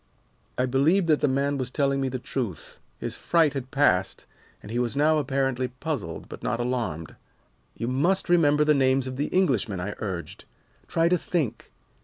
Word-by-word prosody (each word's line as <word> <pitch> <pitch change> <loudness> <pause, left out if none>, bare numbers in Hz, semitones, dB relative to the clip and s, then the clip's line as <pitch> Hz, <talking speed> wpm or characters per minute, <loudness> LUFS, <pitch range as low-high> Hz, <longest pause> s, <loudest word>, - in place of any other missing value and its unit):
"I 125 - +2
believed 145 +9 +3
that 155 - +3
the - - +3
man 140 +1 0
was 130 -2 -2
telling 140 0 0
me 135 - 0
the 130 - -3
truth. 120 - -5 0.2
His - - -5
fright 165 -4 +2
had 135 -2 -5
passed, 95 -10 +1 0.4
and 105 - -9
he 120 - -1
was 125 +2 -1
now 155 +1 +4
apparently 135 -2 0
puzzled, 125 - -5
but - - -10
not 120 - -1
alarmed. 120 -10 -2 0.6
"'You 115 - -4
must 170 +10 +1
remember 150 -4 +4
the 150 - +5
names 135 -1 +2
of 130 -1 -5
the 145 - -2
Englishmen,' 125 - +1
I 100 +3 -3
urged. 95 -5 -5 0.4
'Try 165 0 +2
to 180 0 +2
think. 155 -10 -2
135 Hz, 180 wpm, -26 LUFS, 120-150 Hz, 0.6 s, the